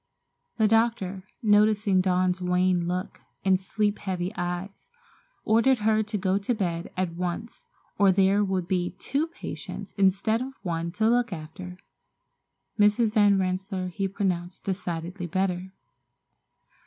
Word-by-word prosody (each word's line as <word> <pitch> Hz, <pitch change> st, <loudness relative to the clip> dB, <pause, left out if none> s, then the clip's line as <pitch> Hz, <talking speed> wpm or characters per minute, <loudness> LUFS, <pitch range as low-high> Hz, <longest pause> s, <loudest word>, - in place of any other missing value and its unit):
The 220 Hz, -2 st, +4 dB
doctor, 210 Hz, -4 st, +1 dB, 0.2 s
noticing 210 Hz, -2 st, +4 dB
Dawn's 185 Hz, 0 st, +1 dB
wan 180 Hz, -1 st, +2 dB
look 180 Hz, +2 st, -4 dB, 0.2 s
and 190 Hz, -1 st, +4 dB
sleep 205 Hz, +2 st, -1 dB
heavy 185 Hz, 0 st, -3 dB
eyes, 180 Hz, -, -5 dB, 0.6 s
ordered 230 Hz, +4 st, +4 dB
her 220 Hz, 0 st, +4 dB
to 210 Hz, 0 st, -3 dB
go 190 Hz, 0 st, +1 dB
to 220 Hz, +5 st, -1 dB
bed 175 Hz, -5 st, -2 dB
at 185 Hz, -2 st, -1 dB
once 180 Hz, +6 st, -5 dB, 0.3 s
or 200 Hz, -1 st, +6 dB
there 195 Hz, +2 st, +3 dB
would 190 Hz, -3 st, -1 dB
be 180 Hz, -1 st, -1 dB
two 285 Hz, +9 st, -1 dB
patients 335 Hz, -, -8 dB
instead 200 Hz, +4 st, +2 dB
of 265 Hz, +1 st, -5 dB
one 170 Hz, -2 st, -2 dB
to 220 Hz, +4 st, +1 dB
look 240 Hz, 0 st, +2 dB
after. 180 Hz, +2 st, -8 dB, 1.0 s
Mrs. 210 Hz, +2 st, +4 dB
Van 205 Hz, -3 st, +5 dB
Rensselaer 185 Hz, 0 st, -2 dB
he 195 Hz, +2 st, -2 dB
pronounced 180 Hz, -2 st, -2 dB
decidedly 180 Hz, -1 st, -4 dB
better. 185 Hz, +1 st, -1 dB
190 Hz, 130 wpm, -26 LUFS, 180-210 Hz, 1.0 s, or